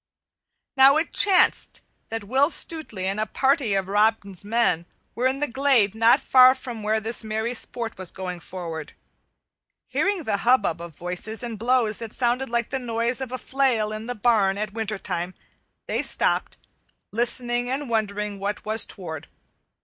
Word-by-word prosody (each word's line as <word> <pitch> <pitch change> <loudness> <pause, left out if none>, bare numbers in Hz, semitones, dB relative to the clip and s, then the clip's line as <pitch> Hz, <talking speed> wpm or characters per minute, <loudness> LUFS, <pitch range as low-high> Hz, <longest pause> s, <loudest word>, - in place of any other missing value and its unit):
Now 270 +2 +7
it 325 +1 -2
chanced 385 -3 +2 0.3
that 225 -1 -4
Will 265 +8 +2
Stutely 310 - 0
and 195 +2 -2
a 215 - -1
party 265 -4 +1
of 195 -1 -1
Robin's 205 -2 +1
men 205 -6 +1 0.3
were 250 +2 +1
in 270 +2 -2
the 295 - +2
glade 260 -6 +2
not 225 +2 +4
far 255 0 +6
from 245 -4 -8
where 215 +1 0
this 225 +2 -2
merry 220 +2 -2
sport 230 -3 -5
was 185 -2 -3
going 180 -2 -6
forward. 165 -4 -7 0.9
Hearing 400 -4 -1
the 215 -6 0
hubbub 200 -7 +2
of 170 -3 -9
voices, 180 +7 -3
and 230 -3 -5
blows 235 -2 +1
that 230 -2 -6
sounded 250 +1 0
like 235 -1 -1
the 265 - -1
noise 235 +1 -1
of 260 -2 -4
a 255 - -3
flail 255 -6 0
in 215 +1 -6
the 245 - -3
barn 205 -3 +2
in 210 0 -4
wintertime, 200 -5 -4 0.5
they - - -1
stopped, - - +1 0.5
listening 240 +1 +1
and 275 +2 -3
wondering 210 -3 -2
what 200 +1 -4
was 220 +1 +1
toward. 160 -6 -7
225 Hz, 165 wpm, -24 LUFS, 200-255 Hz, 0.9 s, Now